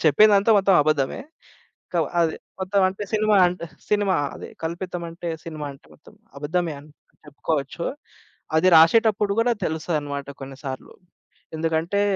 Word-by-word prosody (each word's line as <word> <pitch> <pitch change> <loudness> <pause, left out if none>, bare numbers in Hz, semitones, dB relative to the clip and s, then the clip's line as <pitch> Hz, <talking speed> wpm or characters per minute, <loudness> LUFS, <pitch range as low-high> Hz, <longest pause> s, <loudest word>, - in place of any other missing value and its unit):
చెప్పేదంతా 205 +7 +5
మొత్తం 195 -1 +3
అబద్ధమే. 145 -3 0 0.7
క - - -21 0.3
అది 165 -1 +2 0.3
మొత్తం 190 +1 +1
అంటే 195 +2 -6
సినిమా 215 -1 +3
అంటే 175 -1 -3 0.3
సినిమా 205 -2 +2 0.2
అది - - -9
కల్పితం 175 +2 -4
అంటే 170 +1 -6 0.2
సినిమా 155 -3 -6
అంటే 135 - -19
మొత్తం. - - -19 0.2
అబద్ధమే 165 +3 -1
అని 150 +1 -17 0.4
చెప్పుకోవచ్చు. 150 +3 -3 0.7
అది 185 +3 +4
రాశెటప్పుడు 210 +4 +5
గూడా 235 +1 +3
తెలుస్తదన్నమాట 150 -3 -3
కొన్ని 135 0 -8
సార్లు. 130 -1 -6 0.6
ఎందుకంటే 165 +4 0
170 Hz, 130 wpm, -23 LUFS, 150-195 Hz, 0.7 s, చెప్పేదంతా